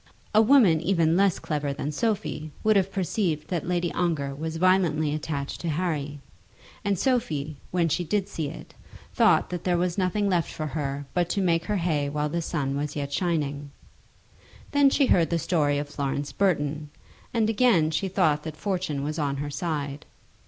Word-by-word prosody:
A 215 - +7
woman 220 - +5
even 170 -3 +2
less 195 0 +3
clever 145 -2 -2
than 145 +1 -3
Sophie 155 -4 -2
would 215 0 +4
have 195 -1 +2
perceived 180 -4 -1
that 175 -3 -2
Lady 175 -1 0
Ongar 150 -6 -1
was 160 +3 -4
violently 165 -4 +2
attached 145 -2 -4
to 170 - -2
Harry; 150 -3 -2 0.6
and 200 -2 +1
Sophie, 155 - -1
when 175 -2 +1
she 165 +3 0
did 195 +4 -1
see 155 -3 -3
it, - - -11 0.4
thought - - +3
that 175 -2 -4
there 175 -1 +1
was 175 +2 0
nothing 195 +2 +1
left 175 -4 +1
for 155 - -4
her 145 -1 -3
but 175 -1 +1
to - - 0
make 170 -3 +1
her 210 - 0
hay 155 -5 0
while 150 +1 -1
the 170 +2 -1
sun 140 -4 -2
was 145 +1 -3
yet 140 -1 -3
shining. 145 -5 -1 1.0
Then 285 -1 +5
she 275 +1 +3
heard 170 -9 +3
the 170 - +1
story 150 -3 +1
of 145 0 -3
Florence 140 0 -3
Burton; 150 -6 0 0.4
and 225 -2 +1
again 210 -9 +3
she 155 +5 -1
thought 180 -6 +2
that 155 -1 -7
Fortune 180 -7 -2
was 155 +2 -3
on 140 -2 -1
her 145 +1 -4
side. 145 -4 -3
160 Hz, 180 wpm, -26 LUFS, 145-185 Hz, 1.0 s, A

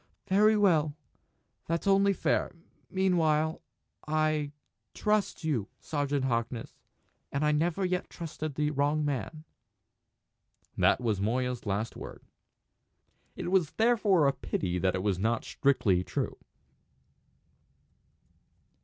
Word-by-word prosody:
"Very 210 +3 +4
well! 160 -8 +3 0.7
That's 165 +3 -1
only 195 0 +4
fair. 195 - 0 0.3
Meanwhile 160 -5 +1 0.5
I 155 -1 +1 0.4
trust 210 -4 0
you, 130 -10 0
Sergeant 145 -2 -1
Harkness. 115 -1 -2 0.6
And 140 +2 0
I 150 - +3
never 170 +5 +1
yet 180 0 -1
trusted 155 -3 -6
the 150 0 0
wrong 145 +1 +1
man!" 145 +3 -3 1.3
That - - +3
was 110 -5 0
Moya's 125 +2 -1
last 105 +3 -2
word. - - -9 1.1
It - - -5
is 175 -4 +1
therefore 215 -9 +3
a 140 - +2
pity 90 -7 -2
that 95 0 +1
it 90 - -2
was 100 -3 0
not 115 +3 0
strictly 100 -10 +2
true. - - -3
150 Hz, 110 wpm, -29 LUFS, 125-175 Hz, 1.3 s, Very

